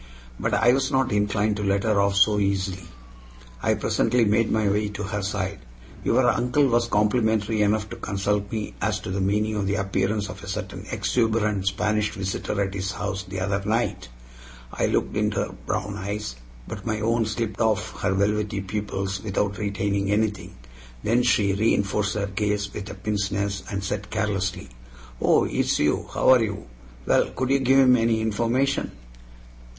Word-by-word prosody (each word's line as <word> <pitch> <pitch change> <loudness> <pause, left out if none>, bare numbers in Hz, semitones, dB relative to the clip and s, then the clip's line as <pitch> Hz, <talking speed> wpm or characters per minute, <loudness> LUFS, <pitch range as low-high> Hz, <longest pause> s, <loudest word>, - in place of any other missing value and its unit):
But 110 0 0
I 115 +4 +5
was 135 0 +1
not 135 -1 +2
inclined 105 0 +1
to 105 - -3
let 100 0 +1
her 105 -3 +2
off 100 0 +1
so 105 +1 +4
easily. 95 -3 -1 0.7
I - - +2
presently 120 -2 +2
made 110 +2 +2
my 110 -1 +2
way 105 +1 +1
to 105 0 -5
her 105 +1 -3
side. 100 -1 -3 0.4
"Your - - +3
uncle 125 +4 +2
was 120 -2 +2
complimentary 110 0 +1
enough 105 +1 +2
to - - -6
consult 100 +1 -1
me 110 -2 -3
as 105 -1 0
to 95 - -5
the 95 +1 -1
meaning 105 +3 +1
of 100 -2 -1
the 100 - +1
appearance 100 +1 0
of 95 0 -9
a - - -8
certain 95 0 -5
exuberant 110 -5 0
Spanish 105 +2 +1
visitor 95 +1 -3
at 95 -1 -4
his 95 0 -3
house 100 -1 -3
the 95 0 -5
other 100 +1 0
night." 110 - -1 0.6
I - - +1
looked - - 0
into - - 0
her - - -7
brown 100 +1 -2
eyes, 100 - -4 0.3
but - - -7
my 110 -1 -2
own 115 +1 +1
slipped 110 -1 -3
off 110 -3 0
her 95 - +1
velvety 100 0 0
pupils 95 -1 -3
without 100 0 -1
retaining 100 -1 -1
anything. 105 -3 -1 0.5
Then 120 +3 +3
she 105 -5 +3
reinforced 105 -1 +1
her 100 -1 0
gaze 100 0 -2
with 105 0 -6
a - - -7
pince 105 -2 -1
nez, 100 -1 -1
and 100 -1 -3
said 100 0 -3
carelessly: 100 -4 -2 0.5
"Oh, - - +4
it's - - 0
you? 75 0 0
How - - +2
are 130 -2 +7
you? 105 -2 -4 0.4
Well, - - +3
could 130 +1 -1
you 140 - +4
give 135 0 +4
him 130 -2 +6
any 115 -1 +2
information?" 120 +5 0
105 Hz, 175 wpm, -24 LUFS, 100-110 Hz, 0.7 s, are